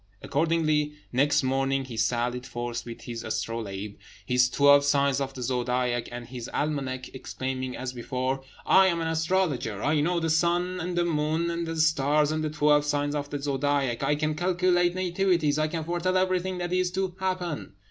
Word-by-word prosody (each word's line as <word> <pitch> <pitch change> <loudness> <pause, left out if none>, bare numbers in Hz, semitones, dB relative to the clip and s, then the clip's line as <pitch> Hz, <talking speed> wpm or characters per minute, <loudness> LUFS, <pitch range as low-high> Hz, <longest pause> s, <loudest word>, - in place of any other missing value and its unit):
Accordingly, 155 -1 +1 0.2
next 145 +3 +3
morning 135 +1 0
he 125 -3 -8
sallied 120 +3 -1
forth 120 -1 -4
with 115 - -8
his 115 -1 -6
astrolabe, 105 -3 -4 0.3
his 125 0 +3
twelve 140 +1 +5
signs 140 -1 +2
of 135 0 -3
the 125 - -5
zodiac, 125 -1 -1
and 120 0 -6
his 120 -1 -7
almanac, 135 -4 -2
exclaiming, 130 -1 -4
as 130 0 -4
before, 130 +2 -2 0.2
"I 190 0 +6
am 170 -2 +1
an 165 - -1
astrologer! 160 - 0
I 150 0 +2
know 170 +3 +1
the 165 -1 0
sun, 175 +3 +1
and 175 +1 -3
the 175 - +2
moon, 160 +1 0
and 170 0 -3
the 165 - -3
stars, 150 -1 +3
and 155 0 -1
the 155 - -1
twelve 150 -1 +3
signs 145 0 0
of 145 -1 -3
the 145 - -3
zodiac; 140 -3 0
I 150 - +2
can 155 +1 -1
calculate 175 +1 +2
nativities; 175 -5 +1
I 155 - +2
can 160 0 -3
foretell 175 +3 0
everything 185 0 0
that 175 0 -3
is 185 0 +2
to 190 -1 -2
happen!" 185 - -3
145 Hz, 180 wpm, -27 LUFS, 130-170 Hz, 0.3 s, I